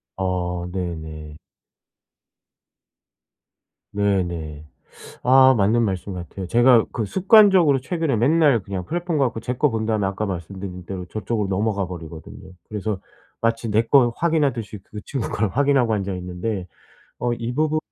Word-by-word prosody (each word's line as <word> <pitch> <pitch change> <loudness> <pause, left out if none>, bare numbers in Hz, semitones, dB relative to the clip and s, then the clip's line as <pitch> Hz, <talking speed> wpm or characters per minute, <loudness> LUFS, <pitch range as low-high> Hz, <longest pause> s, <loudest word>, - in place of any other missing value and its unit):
어 90 -2 -2
네네. 80 -4 -6 2.6
네네. 85 -7 -2 0.6
아 130 +1 +6
맞는 110 +3 +3
말씀 95 -1 -3
같아요. 90 +2 -7
제가 120 +2 +5
그 115 - -2
습관적으로 185 - +5
최근에 160 -1 -1
맨날 140 +1 +3
그냥 95 -1 -5
플랫폼 170 - -2
가 140 - +3
갖고 115 -2 -4
제 125 +2 -3
거 150 +3 +2
본 110 -1 -2
다음에 110 -3 0
아까 100 +2 -2
말씀드린 90 0 -6
대로 90 0 -6
저쪽으로 105 +1 -3
넘어가 100 0 0
버리거든요. 85 +1 -10 0.2
그래서 105 -2 -3 0.4
마치 115 0 0
내 110 +2 +3
거 120 +1 +4
확인하듯이 140 -11 0
그 105 - -9
친구 135 -1 -4
걸 105 0 0
확인하고 135 -1 +2
앉아 100 -2 -2
있는데 90 +2 -4 0.5
어 120 0 -1
이 120 0 -3
부분에 155 +2 +1
105 Hz, 300 characters per minute, -22 LUFS, 95-125 Hz, 2.6 s, 아